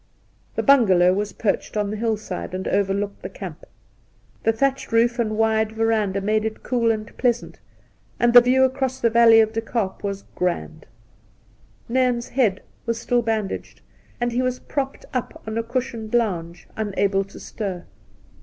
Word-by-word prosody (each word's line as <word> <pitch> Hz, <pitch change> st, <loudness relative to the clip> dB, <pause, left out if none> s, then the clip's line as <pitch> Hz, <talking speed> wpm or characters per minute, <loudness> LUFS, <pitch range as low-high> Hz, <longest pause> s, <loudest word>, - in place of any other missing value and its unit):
The -, -, -1 dB
Bungalow 190 Hz, -10 st, +5 dB
was 205 Hz, +1 st, -2 dB
perched 215 Hz, 0 st, -2 dB
on 205 Hz, -1 st, 0 dB
the -, -, -3 dB
hillside, 215 Hz, -4 st, -3 dB
and 185 Hz, -, -4 dB
overlooked 200 Hz, +1 st, -1 dB
the -, -, -6 dB
camp. -, -, -9 dB, 0.8 s
The 225 Hz, -, +3 dB
thatched 270 Hz, +3 st, -1 dB
roof 235 Hz, +2 st, +3 dB
and 215 Hz, -2 st, 0 dB
wide 220 Hz, 0 st, +2 dB
veranda 220 Hz, -3 st, +1 dB
made 215 Hz, +2 st, +1 dB
it 220 Hz, 0 st, -4 dB
cool 235 Hz, -2 st, +1 dB
and 215 Hz, -1 st, -2 dB
pleasant, 240 Hz, -2 st, 0 dB, 0.6 s
and 240 Hz, 0 st, +3 dB
the 245 Hz, -, +11 dB
view 255 Hz, +2 st, +3 dB
across 260 Hz, 0 st, 0 dB
the 230 Hz, -, +2 dB
great 235 Hz, 0 st, +6 dB
vaUey 225 Hz, 0 st, +8 dB
of 220 Hz, 0 st, -3 dB
De 225 Hz, -, -1 dB
Kaap 225 Hz, -4 st, -3 dB
was 200 Hz, -1 st, -3 dB
grand. 170 Hz, -3 st, -3 dB, 1.0 s
Nairn's 245 Hz, -1 st, +1 dB
head 225 Hz, -7 st, +1 dB, 0.2 s
was 230 Hz, 0 st, -1 dB
still 240 Hz, +1 st, +1 dB
bandaged, 220 Hz, -3 st, -3 dB, 0.4 s
and 240 Hz, 0 st, 0 dB
he 245 Hz, +2 st, 0 dB
was 255 Hz, 0 st, 0 dB
propped 275 Hz, -1 st, -4 dB
up 250 Hz, -2 st, -4 dB
on 220 Hz, 0 st, -4 dB
a 230 Hz, -, +1 dB
cushioned 235 Hz, -1 st, -3 dB
lounge, 175 Hz, -7 st, -1 dB
unable 200 Hz, -2 st, 0 dB
to 195 Hz, -, -13 dB
stir. 190 Hz, -5 st, -5 dB
225 Hz, 165 wpm, -23 LUFS, 200-240 Hz, 1.0 s, the